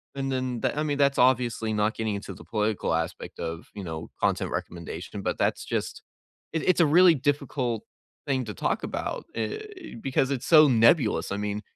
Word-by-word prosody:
and 135 0 -2
then 130 -2 -2
that - - -1
I 150 - +1
mean, 145 -2 -1
that's 140 -1 +3
obviously 120 -3 +2
not 105 0 +1
getting 110 -2 -2
into 100 - -6
the - - -13
political 105 -4 -1
aspect 80 +2 -3
of, 85 0 -5
you 100 - -6
know, 80 -1 -6
content - - 0
recommendation. 85 +3 -5
But - - -2
that's - - 0
just - - -3 0.5
it 160 - -1
it's 180 -2 +4
a - - +6
really 175 +3 +6
difficult 135 -4 -1 0.4
thing 130 -2 +1
to 105 - -5
talk - - -1
about. - - -4
Eh, 360 - -5
because 135 -3 +1
it's 130 -3 -2
so 155 -2 +8
nebulous. 115 -1 +3
I 100 - -1
mean, 105 0 -3
120 Hz, 190 wpm, -26 LUFS, 105-145 Hz, 0.5 s, so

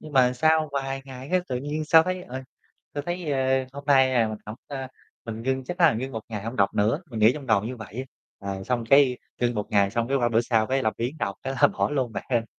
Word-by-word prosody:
nhưng 155 - -11
mà 125 -2 +5
sau 155 +4 +3
vài 135 -1 -3
ngày 130 0 -9
cái 185 0 +3
tự 125 - -1
nhiên 145 +4 -3
sao 160 +1 +7
thấy, 185 +1 -3
ờ, 130 -4 -7 0.5
sao 145 - -2
thấy, 175 -3 -3
ơ, 130 -1 +1
hôm 140 +1 -8
nay, 135 -2 +5
à, 115 -2 +3
mình 110 - -5
hổng, 105 - -6
ơ, 135 -2 -5 0.4
mình 115 -1 -6
ngưng 130 +1 -1
chắc 180 +6 -6
là 165 -3 +7
ngưng 130 +4 -4
1 110 - -4
ngày 105 -3 -5
hông 115 +3 -5
đọc 100 -1 +2
nữa, 110 - +1
mình 115 - -4
nghĩ 110 +3 +6
trong 140 -3 -8
đầu 105 -3 +3
như 125 +3 -4
vậy. 110 +3 -7 0.3
Ờ, 95 -1 -5
xong 120 0 -1
cái, 135 -3 +6 0.2
ngưng 120 0 +1
1 105 -2 -2
ngày 100 -1 +3
xong 115 +2 -1
cái 135 - +2
qua 120 -3 +2
bữa 115 0 +3
sau 115 -2 +1
cái 135 +2 0
làm 110 - +1
biếng 125 +7 -3
đọc 100 -6 -2
thế 135 - -2
là - - +8
bỏ - - -1
luôn 130 -5 -1
bạn - - -5
hén. 115 -3 +2
130 Hz, 270 wpm, -25 LUFS, 115-140 Hz, 0.5 s, là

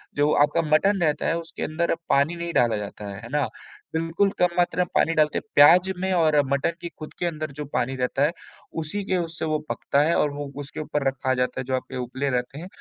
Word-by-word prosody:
जो 145 +1 +3
आपका 150 +3 +3
मटन 195 +4 +2
रहता 150 -2 +1
है 165 - +1
उसके 165 -1 -6
अंदर 165 +2 0
पानी 140 +5 +3
नहीं 170 0 -4
डाला 120 -3 +3
जाता 105 0 -7
है, 95 - -8
है 120 - -8
ना? 145 -1 0 0.5
बिल्कुल 165 +5 +1
कम 180 - +5
मात्रा 180 0 +2
में - - -7
पानी 165 - +3
डालते 155 -1 +3
हैं, - - -17
प्याज़ 175 +6 +7
में 190 0 0
और 160 -4 +3 0.2
मटन 140 +4 +1
की 170 - -4
खुद 155 - -8
के 175 - -1
अंदर 155 -3 -3
जो 150 - -3
पानी 135 +2 0
रहता 130 +2 0
है, 150 - +3 0.5
उसी 200 +6 -4
के 185 - +2
उससे 165 -1 -3
वो 155 -1 0
पकता 140 - 0
है 165 +2 +2
और 145 - +2
वो 145 -1 -6
उसके 145 - -8
ऊपर 150 -2 -2
रखा 135 -1 0
जाता 125 0 -1
है, - - -2
जो 130 - 0
आपके 130 - -5
उपले 130 +3 -2
रहते 125 +2 -2
हैं, 180 - -7
150 Hz, 240 wpm, -24 LUFS, 135-170 Hz, 0.5 s, प्याज़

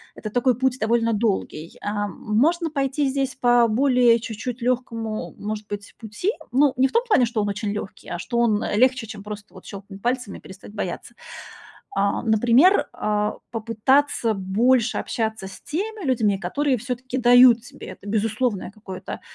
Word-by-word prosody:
Это 215 -1 -7
такой 245 0 +2
путь 260 0 0
довольно 230 +1 +1
долгий. 200 -7 -2
Эм, 205 -2 -2
можно 320 +10 +1
пойти 275 0 0
здесь 270 -1 -2
по 240 -1 +4
более 245 0 +4
чуть-чуть 230 +2 -6
легкому, 230 -3 -2
может 210 0 -5
быть, 205 0 -7
пути. 225 - -2 0.2
Ну, 270 +1 +3
не 265 +1 +4
в - - -11
том 465 +1 +2
плане, 340 - +4
что 225 -2 -1
он 205 - -1
очень 205 +1 -3
легкий, 210 -1 -7
а 175 - -3
что 235 +6 -2
он, 220 -3 +2
э, - - -2
легче, 255 +1 +3
чем 210 -1 -9
просто 210 0 -9
вот - - -14
щелкнуть 200 -1 -10
пальцами 245 -3 -2
и - - -21
перестать 190 +2 -13
бояться. 200 +3 -5 0.9
А, 200 0 +1
например, 245 - +4
а, 210 0 -1
попытаться 230 +2 +1
больше 230 +6 +2
общаться 220 -4 -3
с 190 -1 -11
теми 410 +3 -4
людьми, 220 -6 +2
которые 260 +9 0
все-таки 250 +2 -4
дают 245 -1 +6
тебе 245 - -11
это, - - -11
безусловное 220 0 -1
какое-то, 200 -3 -8
230 Hz, 170 wpm, -23 LUFS, 210-255 Hz, 0.9 s, дают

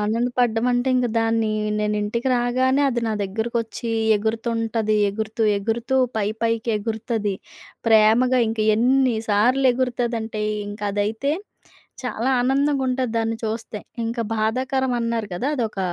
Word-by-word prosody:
ఆనందపడ్డం 230 +1 +1
అంటే, 245 +2 +1
ఇంక 250 -1 +2
దాన్ని 225 -1 +1 0.3
నేనింటికి 210 +3 -1
రాగానే, 255 +3 +2
అది 240 -2 -1
నా 220 - 0
దగ్గరకొచ్చి 230 +3 -3 0.3
ఎగురుతుంటది. 225 0 -1
ఎగురుతూ, 220 +2 -3 0.2
ఎగురుతూ 235 +5 -1 0.2
పైపైకి 225 +2 -1
ఎగురుతది. 220 -1 -2 0.5
ప్రేమగా 225 +4 +5
ఇంకా 220 -1 -1
ఎన్ని 255 +2 +3
సార్లు 245 +6 +3
ఎగురుతదంటే, 235 -3 -2 0.3
ఇంకా 205 0 -5
అదైతే 220 +8 -1 0.7
చాలా 250 +1 -1
ఆనందంగా 275 +2 +1
ఉంటది 255 -2 -1
దాన్ని 225 0 -1
చూస్తే. 220 -1 -4 0.3
ఇంకా 230 +1 -2
బాధాకరం 255 +4 0
అన్నారు 230 -2 -1
కదా! 255 +10 -2
అదొక 225 -6 -2
230 Hz, 115 wpm, -22 LUFS, 220-250 Hz, 0.7 s, ప్రేమగా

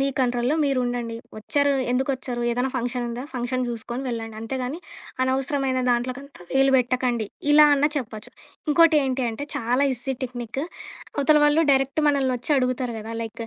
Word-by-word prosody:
మీ 275 - +2
కంట్రోల్‌లో 245 +2 +1
మీరుండండి. 245 -4 -1 0.2
వచ్చారు, 285 +6 +1 0.2
ఎందుకొచ్చారు, 260 -1 -1
ఏదైనా 250 +2 0
ఫంక్షనుందా 245 0 -3
ఫంక్షన్ 255 +1 -2
చూసుకొని 235 +2 -5
వెళ్ళండి. 225 -2 -4
అంతేగాని 255 +6 -4 0.4
అనవసరమైన 265 0 0
దాంట్లోకంతా 255 +1 -3
వేలు 270 0 +4
పెట్టకండి. 245 -3 0 0.2
ఇలా 300 +1 +8
అన్న 285 +1 +3
చెప్పొచ్చు. 220 -5 -5 0.4
ఇంకోటేంటి 295 -5 +4
అంటే, 225 +6 -5
చాలా 245 +5 +1
ఈజీ 260 +2 -3
టెక్నిక్కు 245 +3 -5 0.5
అవతల 300 +1 +4
వాళ్ళు 295 +2 +4
డైరెక్ట్ 270 +3 +2
మనల్నొచ్చి 265 -1 0
అడుగుతారు 255 -2 0
కదా! 220 +1 -7
లైకు 225 0 -6
255 Hz, 135 wpm, -24 LUFS, 240-275 Hz, 0.5 s, ఇలా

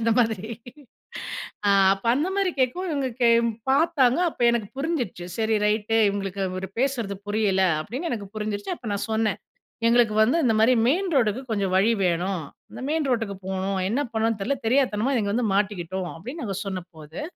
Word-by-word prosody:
அந்த 230 0 +1
மாதிரி 220 -3 +1 1.2
ஆ - - +5 0.2
அப்ப 195 - -15
அந்த 305 +7 0
மாரி 390 -2 +2
கேட்கவும் 340 +8 0
இவங்க 280 -3 -1 0.6
பார்த்தாங்க. 275 -2 +3
அப்ப - - -19
எனக்கு 230 -4 -1
புரிஞ்சிருச்சு 265 - -2
சரி 220 0 +2
ரைட்டு 215 +1 +1
இவுங்களுக்கு 190 -2 -3
பேசுறது 235 -8 -1
புரியல 205 -3 +2 0.2
அப்டின்னு 260 - -4
எனக்கு 205 -4 -4
புரிஞ்சிருச்சு 210 - -3
அப்ப 230 - -8
நான் 200 - -2
சொன்னேன். 220 -1 +1 0.5
"எங்களுக்கு 230 -2 +4
வந்து 255 +9 +2
இந்த 225 - +3
மாரி 235 +3 +5
மெயின் 365 +7 +1
ரோட்டுக்கு 235 -2 +2
கொஞ்சம் 195 -3 0
வழி 200 +5 +4
வேணும், 180 +1 0 0.3
இந்த - - -8
மெயின் 310 -2 0
ரோட்டுக்கு 225 -5 -1
போணும், 190 0 -1
என்ன 240 +7 0
பண்ணணும்னு 220 -1 0
தெரியல 275 +7 0
தெரியாத்தனமா 255 0 +2
இங்கே 200 -2 -1
வந்து 235 0 +1
மாட்டிக்கிட்டோம்." 190 -3 -1
அப்டின்னு 250 - -7
நாங்க 195 -3 -3
சொன்னபோது, 170 - -7
220 Hz, 160 wpm, -25 LUFS, 195-255 Hz, 1.2 s, ஆ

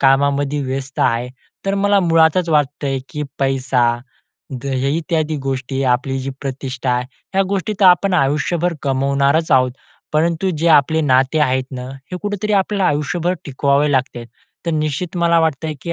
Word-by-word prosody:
कामामध्ये 140 +1 +2
व्यस्त 135 +1 -5
आहे. 120 +2 +1 0.4
तर 195 - +1
मला 205 0 +4
मुळातच 165 0 +3
वाटतंय, 145 -2 0
की 150 - -5 0.2
पैसा, 135 -2 +1 0.8
द - - -14
इत्यादी 155 +3 -1
गोष्टी, 135 0 -2
आपली 135 +1 -3
जी 135 +1 -4
प्रतिष्ठा, 130 -2 -2
ह्या 130 +10 -3
गोष्टी 200 +1 -1
तर 195 - +5
आपण 185 +1 +4
आयुष्यभर 165 +3 +1
कमवणारच 140 +3 +1
आहोत. 130 -1 +4 0.4
परंतु 170 +4 +1
जे 165 +2 +2
आपले 155 +1 +4
नाते 135 0 +2
आहेत 130 -2 +2
नं, 125 0 -6 0.2
हे - - -2
कुठेतरी 205 +1 -2
आपल्याला 195 -1 +2
आयुष्यभर 155 +5 -1
टिकवावे 140 +1 +1
लागतात. 130 -3 -1 0.4
तर - - +1
निश्चित 155 +3 -2
मला 170 -1 +3
वाटतंय, 160 0 -1
की 170 - -3
145 Hz, 145 wpm, -18 LUFS, 135-170 Hz, 0.8 s, तर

